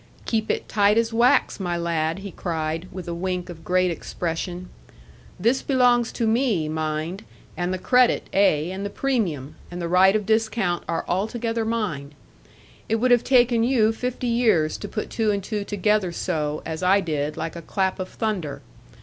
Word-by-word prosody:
'Keep 220 -1 -1
it - - -1
tight 205 0 +3
as 230 0 +1
wax, 245 +2 +3
my 175 -3 -2
lad,' 165 -1 -1
he 200 - -5
cried, 165 0 -3
with 180 -1 -7
a 170 - -3
wink 180 +1 -3
of 165 -2 -9
great 180 +2 +2
expression; 175 +2 -4 0.7
'this 235 +7 +2
belongs 245 -3 +3
to 235 - -2
me, 220 - +1
mind; 155 +5 -3 0.3
and 175 +1 -2
the 185 - -1
credit, 250 +5 +3
ay, 175 -4 +3
and 190 +1 -5
the 200 - -2
premium, 185 - -1 0.2
and 175 - -7
the 170 - -2
right 185 +3 +5
of 210 -2 0
discount, 220 -4 +1
are 165 - -1
altogether 225 +4 -1
mine. 160 -11 -3 0.7
It 225 - +2
would 245 +3 +2
have 245 -1 +5
taken 245 -3 +4
you 230 -3 +3
fifty 250 +2 -4
years 220 -10 +2
to - - -5
put 215 - -5
two 220 -2 0
and 200 -1 0
two 210 0 -3
together 205 -1 +1
so, 155 -4 -2
as 160 0 -4
I 190 +2 +4
did, 150 -4 -2
like 165 - -4
a 170 - -6
clap 190 +3 -1
of 185 - -4
thunder. 195 -10 -3
190 Hz, 180 wpm, -24 LUFS, 170-225 Hz, 0.7 s, right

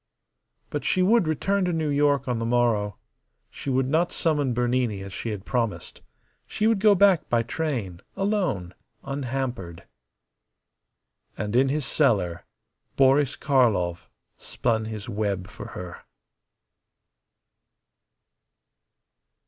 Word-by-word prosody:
But - - -3
she 185 - +2
would 205 -2 +4
return 195 +6 0
to 180 - 0
New 160 -2 -1
York 145 -2 +2
on 120 -2 -1
the - - -2
morrow. 115 -4 +1 0.5
She - - -6
would 130 0 +1
not 165 +5 +1
summon 150 -5 0
Bernini 120 -4 0
as 100 -1 -9
she 115 - -4
had 105 -3 -5
promised. 115 -5 -2 0.5
She 215 - -2
would 225 -2 +3
go 210 0 +5
back 195 -3 +4
by 115 -1 +2
train, 115 - -3
alone, 185 - -1 0.3
unhampered. 130 -10 -4 1.5
And 105 +2 -3
in 135 +2 +4
his 145 0 -1
cellar 100 - +1 0.5
Boris 135 0 +4
Karlov 110 - +1 0.3
spun 110 -2 -1
his 110 -2 -6
web 100 -3 -2
for - - -9
her. 90 -1 -8
125 Hz, 115 wpm, -25 LUFS, 105-155 Hz, 1.5 s, go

